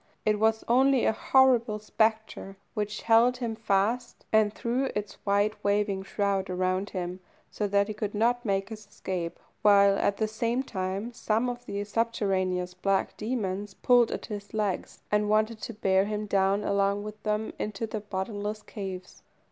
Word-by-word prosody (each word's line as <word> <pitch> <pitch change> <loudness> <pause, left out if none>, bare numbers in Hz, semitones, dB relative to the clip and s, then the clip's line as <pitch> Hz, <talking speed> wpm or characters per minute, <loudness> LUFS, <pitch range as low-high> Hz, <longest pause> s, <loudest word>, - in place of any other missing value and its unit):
it 215 -1 +2
was 220 0 +2
only 260 +2 +4
a - - +4
horrible 240 -2 +3
spectre 220 -2 -1 0.2
which 210 0 -3
held 235 +2 +5
him 235 -3 -3
fast, 220 +3 -1
and 215 -1 +4
threw 240 +5 -1
its 210 -1 -5
wide 205 +2 +2
waving 200 -1 +1
shroud 195 0 -1
around 185 +2 0
him, 180 -1 -4 0.3
so 210 - -1
that 200 0 +2
he 215 - -4
could 210 -1 -4
not 240 +3 +2
make 195 -3 -1
his 215 -2 -9
escape, 180 -4 -4 0.2
while, 200 -1 +6
at 200 - +1
the 220 - +1
same 230 +4 -1
time, 195 +1 -4
some 225 +1 0
of 245 0 -4
the 200 0 -3
subterraneous 195 -5 -1
black 195 +1 0
demons 205 -4 -3
pulled 245 -2 +4
at - - -4
his 205 -1 -7
legs, 205 -4 -2
and 210 0 +2
wanted 215 +1 +1
to - - -5
bear 195 -3 +2
him 210 0 -3
down 195 0 +2
along 200 0 +1
with 210 0 -8
them 215 0 -1
into 210 +1 -3
their 215 -1 -5
bottomless 205 +1 -4
caves. 190 -3 -7
210 Hz, 165 wpm, -28 LUFS, 195-220 Hz, 0.3 s, while